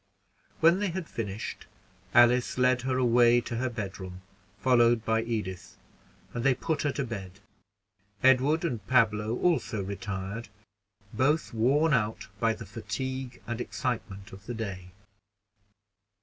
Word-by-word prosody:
When 170 +3 +6
they 205 - 0
had 175 -1 -4
finished, 105 -1 -5 0.4
Alice 120 +1 +4
led 125 -1 +3
her 130 0 -1
away 120 -1 +5
to 120 - -5
her 130 +2 0
bedroom, 95 -5 -6 0.4
followed 120 0 +4
by 115 +1 +2
Edith, 105 -6 -4 0.6
and 120 - -3
they 135 -1 +4
put 160 +4 -2
her 145 - +1
to 140 - -2
bed. 100 -5 -7 0.8
Edward 135 +6 +4
and 120 -10 -2
Pablo 110 -2 +2
also 130 - +1
retired, 100 +2 -5 0.6
both 145 +3 +1
worn 140 +8 +3
out 110 -3 0
by - - +2
the - - -9
fatigue 130 -1 -5
and 120 0 -4
excitement 105 -7 -4
of 95 +1 -13
the 120 - -4
day. 95 -5 -5
120 Hz, 135 wpm, -28 LUFS, 105-130 Hz, 0.8 s, When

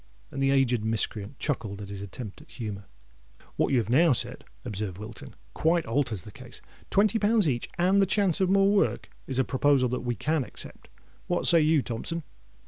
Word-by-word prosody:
And 135 - -4
the 135 - +3
aged 130 -5 +2
miscreant 110 +1 -2
chuckled 110 -9 -3
at 100 -1 -8
his 100 -1 -7
attempt 100 +2 -8
at - - -18
humour. 105 -4 -6 0.7
"What - - +1
you 135 - +3
have 115 -2 0
now 160 +3 +5
said," - - -1 0.2
observed 100 -3 -4
Wilton, 105 +2 -10 0.2
"quite 165 +1 +1
alters 115 - -1
the - - -11
case. - - -12 0.3
Twenty 210 +2 +3
pounds 210 -3 +3
each, 120 -4 -1
and 185 +3 +3
the 195 - +3
chance 195 -2 +3
of 185 - +3
more 195 +1 +4
work, 205 -1 +1 0.2
is 130 - -2
a 130 - +4
proposal 130 -1 +2
that 125 - -2
we 120 -1 -2
can 155 +6 0
accept. - - -9 0.4
What 175 - 0
say 170 -2 +6
you, 155 -2 +3
Thompson?" 155 +8 -3
135 Hz, 195 wpm, -27 LUFS, 110-170 Hz, 0.7 s, say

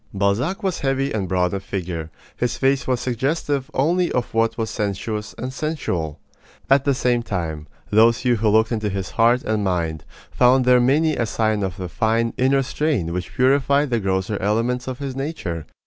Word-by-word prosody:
Balzac 105 - 0
was 190 -3 -1
heavy 135 0 0
and 100 -4 -1
broad 90 -1 +1
of 100 - -2
figure. 85 -5 -4 0.3
His 125 - -1
face 135 0 +1
was 130 -2 +1
suggestive 135 +3 -1
only 170 +6 +1
of 125 -2 -2
what 115 0 +1
was 110 -2 -2
sensuous 105 0 -3
and 130 +2 -5
sensual. 95 - -3 0.5
At 135 0 +5
the 140 -2 +2
same 125 -2 +1
time, 80 -8 -4 0.2
those 115 +2 +5
few 125 -2 +2
who 110 0 +2
looked 110 +2 +3
into 110 -2 -1
his 95 -1 -4
heart 120 +2 +3
and 110 -1 -1
mind 85 -5 -1 0.3
found 125 +1 +4
there 125 0 +6
many 150 +5 +3
a 115 - -1
sign 110 -1 0
of 95 -3 -3
the 90 - -4
fine 115 +7 0
inner 135 +1 +2
strain 130 - -1
which 90 0 -5
purified 140 +2 +3
the 120 - +2
grosser 95 +1 -1
elements 115 +6 0
of 130 -1 -4
his 135 -2 -5
nature. 135 - -4
115 Hz, 185 wpm, -22 LUFS, 100-135 Hz, 0.5 s, there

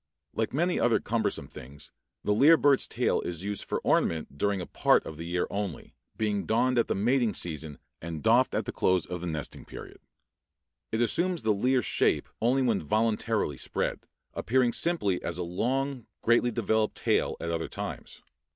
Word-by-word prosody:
Like 110 0 -1
many 175 +6 +1
other 115 0 +3
cumbersome 110 -1 -1
things, 70 +4 -11 0.3
the 105 - +2
lyre 150 +9 +6
bird's 140 -3 +3
tail - - 0
is 85 0 -5
used 100 0 -3
for - - -2
ornament 80 -4 +1
during 100 +5 0
a 90 - -4
part - - +2
of 80 - -7
the 85 +1 -6
year 90 +1 0
only, 100 -5 -4 0.2
being 105 -2 -1
donned 125 +2 +2
at 115 - +2
the - - 0
mating 115 +1 +1
season 80 -3 -3 0.2
and 80 -2 -6
doffed 120 +3 +4
at - - 0
the - - -3
close 90 -3 +1
of 90 -1 -6
the 90 - -4
nesting 80 -4 -5
period. - - -11 0.9
It 110 - 0
assumes 170 - +1
the 110 -1 +3
lyre 125 +4 +2
shape - - +1
only 130 +4 +3
when 115 -5 +1
voluntarily 110 - 0
spread, - - -3 0.3
appearing 125 0 +1
simply 105 - 0
as 85 - -3
a 90 - -2
long, 125 +8 -2 0.2
greatly 120 +1 +4
developed 110 -2 0
tail - - 0
at 85 - -3
other 85 -1 -2
times. - - -7
110 Hz, 180 wpm, -28 LUFS, 90-120 Hz, 0.9 s, lyre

